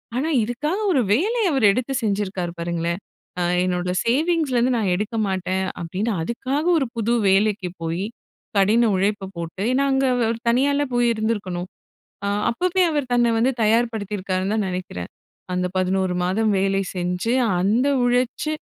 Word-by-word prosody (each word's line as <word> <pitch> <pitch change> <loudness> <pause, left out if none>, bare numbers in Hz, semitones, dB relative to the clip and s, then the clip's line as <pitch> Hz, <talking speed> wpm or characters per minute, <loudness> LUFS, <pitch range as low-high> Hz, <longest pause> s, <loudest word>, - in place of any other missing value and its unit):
ஆனா 280 +6 0
இதுக்காக 295 - -2
ஒரு 275 -7 +3
வேலைய 405 - +2
அவர் 270 -6 +2
எடுத்து 255 +5 -2
செஞ்சிருக்காரு 195 -4 -1
பாருங்களே. 170 0 -1 0.5
ஆ - - +1 0.2
என்னோட 180 0 -1
சேவிங்ஸ்லிருந்து 265 -2 +2
நான் 205 -5 0
எடுக்க 210 +4 -3
மாட்டேன், 190 0 -1 0.2
அப்படீன்னு 190 +7 -2
அதுக்காக 260 - -2
ஒரு 275 - +1
புது 230 +1 0
வேலைக்கு 195 -1 +2
போய் 165 +3 -2 0.5
கடின 220 +4 +4
உழைப்ப 195 0 -1
போட்டு, 170 +3 -6
ஏன்னா 275 +2 +2
அங்க 265 0 +2
அவர் 230 -2 +1
தனியால்லா 280 +4 +2
போய் 240 0 +3
இருந்துருக்கணும். 205 -5 -2 0.6
அ - - +1 0.2
அப்பவே 365 +9 +1
அவர் 290 -5 -2
தன்ன 240 -1 +3
வந்து 250 +4 +2
தயார்படுத்திருக்காருன்னு 210 -4 0
தான் 215 -3 0
நெனக்கிறேன். 180 - -5 0.4
அந்த 180 0 0
11 185 0 +1
மாதம் 215 +4 +1
வேலை 195 0 +1
செஞ்சு 180 +7 -1 0.3
அந்த 225 +8 +2 0.2
உழைச்சு 250 +5 0
215 Hz, 140 wpm, -22 LUFS, 185-250 Hz, 0.6 s, கடின